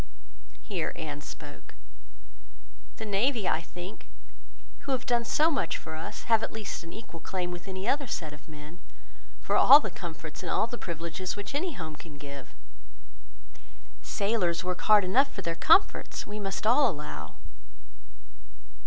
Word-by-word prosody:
Here 185 -6 -2
Anne 150 -3 -5
spoke— 145 -1 -10 1.2
"The 220 - -5
navy, 215 +1 +1
I 160 - +2
think, 175 +4 -9 0.7
who 275 - -2
have 255 - -1
done 240 -2 +2
so 310 +7 +4
much 270 - 0
for 160 - -7
us, 160 - -6
have 225 -2 +4
at - - -2
least 220 -3 -4
an 165 - -9
equal 195 -6 -9
claim 180 +2 -3
with 175 +1 -7
any 190 +2 -4
other 280 +1 +1
set 155 -7 -3
of 145 -1 -14
men, 155 +3 -11 0.6
for - - 0
all 285 - +10
the 215 -9 -4
comforts 165 -3 -7
and - - -3
all - - +3
the 240 +1 -7
privileges 170 +2 -4
which 205 +5 -6
any 330 +4 -1
home 160 - -6
can 150 -2 -11
give. 140 -2 -9 1.5
Sailors 195 -5 0
work 180 0 -2
hard 210 -1 +8
enough 260 +10 +4
for 195 - -6
their 170 - 0
comforts, 320 - +4
we 210 +1 -6
must 195 0 -3
all 250 +4 +6
allow." 150 - -6
185 Hz, 160 wpm, -29 LUFS, 160-225 Hz, 1.5 s, all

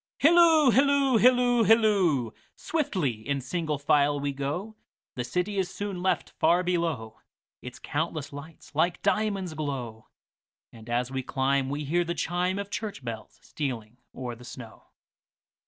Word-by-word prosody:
Hilloo, 320 -3 +6
hilloo, 275 -1 +4
hilloo, 245 -1 +4
hilloo! 195 - +3 0.2
Swiftly 195 - -1 0.2
in 140 -1 +1
single 155 +3 -2
file 145 0 +2
we 140 0 -2
go, 150 +11 -4 0.4
The 125 - -3
city 180 +11 -2
is 185 -1 -1
soon 200 -3 -5
left 185 - 0
far 175 +3 +2
below, 165 -11 -2 0.4
Its 125 - -9
countless 155 -1 -3
lights 145 +2 -11
like 170 +4 0
diamonds 200 -5 0
glow; 130 -8 -5 0.6
And 115 0 -13
as 120 +1 -1
we 135 0 -2
climb 135 +1 0
we 145 +2 -3
hear 175 +5 +1
the 170 0 -3
chimeOf 180 +5 -1
church 210 - -5
bells 115 -2 -7
stealing 120 -6 -5 0.2
o'er 125 -2 -5
the 120 +1 -13
snow. 120 -2 -11
160 Hz, 140 wpm, -27 LUFS, 135-200 Hz, 0.6 s, Hilloo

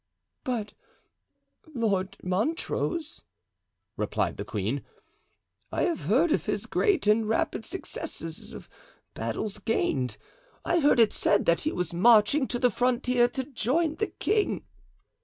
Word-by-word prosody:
"But 225 -5 -3 1.0
Lord 195 -4 0
Montrose," 310 - -2 0.7
replied - - -1
the - - -4
queen, - - -3 0.9
"I - - 0
have 340 - 0
heard 270 - +3
of - - 0
his - - -1
great 405 - +1
and 215 +1 +3
rapid 220 0 0
successes 165 - -5
of - - -10 0.5
battles 115 - -3
gained. 130 - -1 0.5
I 345 - +2
heard 290 -5 +4
it 225 -2 +5
said 205 - +2
that 170 - +3
he 310 - -1
was 180 -2 -2
marching 230 - +5
to 245 - -2
the 245 0 +3
frontier 250 +1 +2
to 260 +2 -3
join 295 +5 0
the 430 - 0
king." 425 0 -1
235 Hz, 130 wpm, -27 LUFS, 200-295 Hz, 1.0 s, it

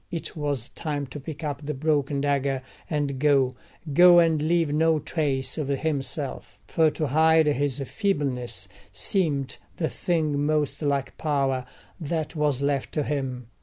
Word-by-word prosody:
It 165 - -5
was 145 -5 -2
time 145 -3 -3
to 135 +3 -8
pick 155 +3 -8
up 145 -1 -3
the 150 0 -3
broken 145 -1 0
dagger 140 -2 0 0.3
and 145 -4 -1
go—go 145 +5 +4
and 165 -3 +4
leave 165 -1 +1
no 160 +1 +3
trace 145 -3 -1
of 150 - -2
himself; 140 -1 -2
for 160 -2 +3
to 155 0 -2
hide 160 +3 +4
his 145 -2 +1
feebleness 140 - -1 0.2
seemed 145 -9 -1 0.2
the 160 - 0
thing 155 -5 0
most 150 0 0
like 140 -2 -1
power 135 -4 0 0.3
that 160 -1 -3
was 145 -3 +1
left 140 -2 0
to 150 - 0
him. 130 -4 -3
145 Hz, 145 wpm, -25 LUFS, 135-155 Hz, 0.3 s, go—go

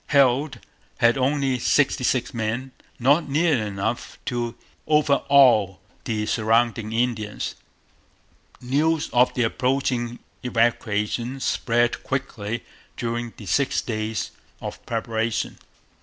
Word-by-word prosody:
Heald 140 0 +3 0.4
had 120 0 +4
only 135 -1 +1
sixty 130 +1 +2
six 125 +2 0
men, 115 +3 -2 0.3
not 145 +5 +3
nearly 150 -3 +2
enough 105 +4 -3
to 120 -1 -2 0.3
overawe 140 -8 +4 0.3
the 110 -2 -1
surrounding 115 0 +1
Indians. 115 -2 -1 1.1
News 150 +5 0
of 125 +1 +5
the 125 - +2
approaching 125 0 0 0.2
evacuation 120 +1 0
spread 120 -2 +1
quickly 115 -5 -3 0.3
during 120 0 -3
the 105 - -10
six 135 +9 +1
days 110 -3 -3 0.3
of - - -7
preparation. 115 0 -2
120 Hz, 100 wpm, -24 LUFS, 115-135 Hz, 1.1 s, of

